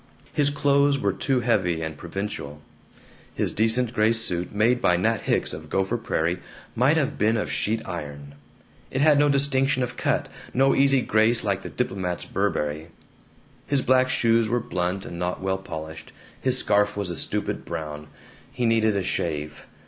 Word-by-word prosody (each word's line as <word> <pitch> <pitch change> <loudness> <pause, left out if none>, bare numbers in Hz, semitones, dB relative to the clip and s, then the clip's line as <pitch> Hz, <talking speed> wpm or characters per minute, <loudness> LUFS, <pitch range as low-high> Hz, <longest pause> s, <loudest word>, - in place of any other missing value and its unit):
His 145 -1 +2
clothes 140 0 +3
were 100 -7 0
too 130 +6 0
heavy 90 -9 +1
and 80 -1 -4
provincial. 85 -4 -6 0.8
His - - 0
decent 115 +2 +1
gray 110 0 +3
suit, 90 -7 +1
made 115 +4 +2
by 90 0 +3
Nat 110 +5 +1
Hicks - - +1
of 80 0 -8
Gopher 95 +7 0
Prairie, 90 -6 -1 0.4
might 135 +7 +3
have 145 -4 -1
been 110 +2 +3
of 105 - -2
sheet 110 +2 -1
iron; 70 -5 -7 0.6
it 130 - -2
had 150 -1 +5
no 145 0 +4
distinction 135 -1 +2
of 120 - -5
cut, - - 0 0.3
no 135 +2 +4
easy 135 -1 +4
grace 110 +1 +3
like 100 -2 -1
the - - -7
diplomat's 95 -7 -3
Burberry. 80 -5 -2 0.8
His 140 -2 +1
black 130 0 +3
shoes 115 -3 +2
were 120 +2 +1
blunt 95 -4 -2
and 85 - -7
not 90 +1 -2
well 95 0 -1
polished. 80 -4 -8 0.3
His 130 -1 +1
scarf 105 -3 +1
was 100 -3 -2
a - - -4
stupid - - -2
brown. 75 -1 -6 0.4
He 125 -3 -2
needed 110 -2 +3
a 100 - 0
shave. 75 -4 -3
105 Hz, 170 wpm, -24 LUFS, 90-125 Hz, 0.8 s, had